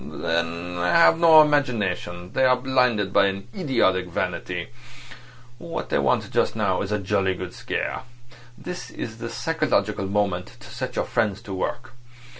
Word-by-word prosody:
"They - - -5
have 90 - +2
no 160 -2 +8
imagination. 105 -11 -1
They 130 - +2
are 125 0 +5
blinded 125 -6 +1
by 100 -1 +5
an 100 +1 -4
idiotic 115 - +1
vanity. 90 0 -3 0.9
What 170 -1 -5
they - - +1
want - - +1
just - - +1
now - - 0
is 100 - -4
a 105 - +1
jolly 95 -1 0
good 90 0 -7
scare. - - -3 0.6
This 180 0 -7
is 110 0 -7
the 115 0 -5
psychological 115 - -1
moment 100 -1 -1
to 115 - -13
set 125 +1 -5
your - - 0
friends 105 -5 0
to 100 - -7
work. 120 +7 -4
105 Hz, 155 wpm, -24 LUFS, 95-130 Hz, 0.9 s, no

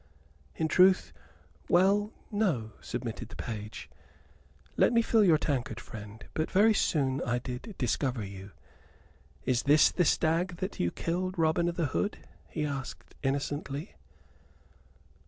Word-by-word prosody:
"In 160 - 0
truth 185 +3 +4 0.6
well, 200 +4 +4 0.2
no," 170 - 0
submitted 120 -1 -5
the - - -11
page. 110 -2 -6 0.9
"Let - - +4
me 230 0 +4
fill 225 -1 +4
your 170 -5 +6
tankard, 140 -5 -2
friend. 105 -1 -10
But 155 - -1
very 215 +3 +5
soon 140 -9 +1
I 120 -1 0
did 125 - -6
discover 125 -2 -1
you. 95 0 -9 1.0
Is 125 -1 +2
this 150 +2 +5
the 180 - +2
stag 170 +3 +1
that 190 +2 -4
you 85 - +2
killed, 185 - -2
Robin 165 +1 +2
o' - - 0
th' 170 -4 -1
Hood?" 205 - -1 0.3
he 155 -2 -2
added, 140 -2 -4 0.3
innocently. 145 +3 -2
150 Hz, 135 wpm, -30 LUFS, 125-185 Hz, 1.0 s, your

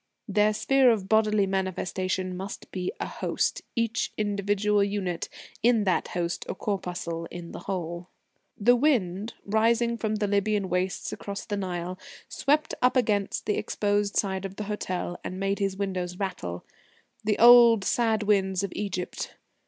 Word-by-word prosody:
Their 210 +1 +3
sphere 265 +4 +4
of 210 -5 +1
bodily 215 -1 +3
manifestation 185 -1 -2
must 190 +2 -7
be 180 -1 -2
a - - -2
host, - - -1
each 230 -1 0
individual 205 0 +1
unit 195 -4 -2 0.3
in 230 -2 +4
that 185 -3 +1
host 170 0 -2
a - - -2
corpuscle 175 -5 -3
in 175 -1 -8
the - - -7
whole. 175 -2 -3 0.5
The 240 +4 +5
wind, 225 - +1
rising 230 +3 +2
from 215 -1 -1
the 210 0 0
Lybian 205 -1 +1
wastes 180 +1 -1
across 200 -1 -6
the 205 - -2
Nile, 180 -1 -4 0.3
swept 300 +3 +1
up 250 +1 +4
against 210 -5 0
the 210 - 0
exposed 205 0 0
side 190 -2 0
of 195 0 -6
the 210 - -4
hotel, 185 -4 -3
and 185 - -5
made 195 +1 0
his 195 -1 -1
windows 185 -3 -3
rattle 95 - -4 0.6
the 210 0 +1
old, 235 -3 +8
sad 220 0 +1
winds 195 -2 +2
of 200 - -3
Egypt. 185 -3 -4
200 Hz, 150 wpm, -27 LUFS, 185-215 Hz, 0.6 s, old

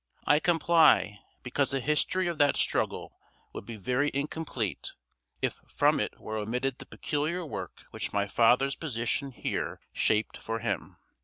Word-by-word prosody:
I 145 - +5
comply, 160 - +4 0.2
because 135 +2 0
the 135 - 0
history 150 +6 +1
of 170 -2 -3
that 145 -1 +4
struggle - - -1 0.3
would - - -8
be 115 - -6
very 125 +8 0
incomplete, 140 - -3 0.5
if - - -1
from - - +2
it - - -3
were 110 0 -5
omitted 125 +5 -2
the - - -10
peculiar 160 +4 -2
work 150 - -7
which - - -4
my 100 0 0
father's 125 +6 +3
position 135 -1 -2
here 125 - -3
shaped 110 0 +1
for 115 0 -4
him. 115 - -3
135 Hz, 150 wpm, -29 LUFS, 115-150 Hz, 0.5 s, I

